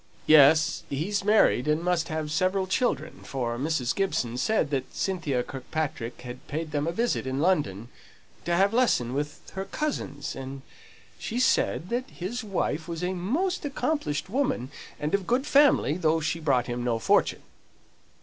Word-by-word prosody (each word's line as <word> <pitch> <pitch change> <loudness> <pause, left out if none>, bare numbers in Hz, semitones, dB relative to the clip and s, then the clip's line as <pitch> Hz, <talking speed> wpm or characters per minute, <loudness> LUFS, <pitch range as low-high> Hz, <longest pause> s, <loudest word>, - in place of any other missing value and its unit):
"Yes, 155 +1 +6
he's 195 +9 -1
married, 205 - +4
and 155 +2 +1
must 175 -2 +1
have 155 -2 -3
several 185 +4 +1
children, 185 - -1
for 120 -3 -3
Mrs. 140 -4 0
Gibson 155 -12 -1
said 150 - +1
that 135 -2 -3
Cynthia 155 -10 -1
Kirkpatrick 135 -3 -4
had 125 +1 -9
paid 155 +1 -4
them 145 0 -1
a - - +1
visit 230 - -1
in 130 +1 -2
London, 145 - +1 0.6
to 170 +1 +1
have 195 +4 +3
lessons 225 - +2
with 145 +2 -4
her 190 0 -4
cousins. 285 - -3
And 135 0 -7 0.6
she 235 - -3
said 185 -7 +2
that 250 +2 -2
his 225 +8 -5
wife 175 -6 -2
was 170 0 -5
a 180 +1 0
most 295 - -1
accomplished 285 - -2
woman, 200 - -1 0.3
and 150 +1 -2
of 200 -2 0
good 255 +3 +1
family, 275 - +4
though 165 -2 +2
she 160 +1 -2
brought 135 -6 +2
him 120 0 -3
no 120 -2 0
fortune." 115 - +2
160 Hz, 160 wpm, -27 LUFS, 135-195 Hz, 0.6 s, Yes